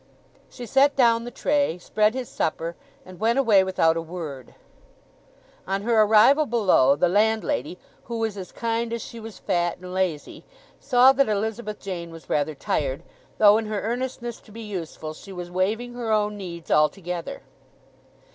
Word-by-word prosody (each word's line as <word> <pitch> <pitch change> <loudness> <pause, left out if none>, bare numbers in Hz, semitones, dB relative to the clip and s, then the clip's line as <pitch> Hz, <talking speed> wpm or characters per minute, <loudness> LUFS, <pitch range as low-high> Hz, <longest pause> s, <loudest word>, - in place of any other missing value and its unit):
She 245 - -9
set 275 +5 +3
down 235 -3 +3
the - - -5
tray, 285 - 0
spread 215 +5 +1
his 255 -2 -4
supper, 165 +1 -3 0.3
and 185 -1 -13
went 230 +4 +2
away 220 -8 +5
without 175 -3 +2
a 165 - -2
word. 160 -7 -8 1.1
On 195 +1 -2
her 225 -1 +3
arrival 225 +8 +5
below 190 - +4
the 170 +5 +2
landlady, 220 +3 0 0.3
who 235 -1 -5
was 225 -2 -2
as 190 -2 -8
kind 230 0 -2
as 235 - -3
she 235 - -9
was 225 -2 -9
fat 175 -1 -1
and 180 0 -9
lazy, 185 -5 -2 0.4
saw 260 -1 +5
that 270 -2 +2
Elizabeth 215 +1 -3
Jane 175 -3 -6
was 165 -1 -12
rather 150 +1 0
tired, 135 0 -2 0.3
though 210 0 +6
in 220 - -5
her 210 -1 -2
earnestness 240 +1 -4
to - - -18
be 225 +2 -9
useful 165 -6 -6
she 195 +5 -12
was 175 -1 -7
waiving 215 +7 -1
her 240 -2 -3
own 210 -1 +1
needs 175 -4 -8
altogether. 170 +2 0
210 Hz, 165 wpm, -24 LUFS, 175-235 Hz, 1.1 s, though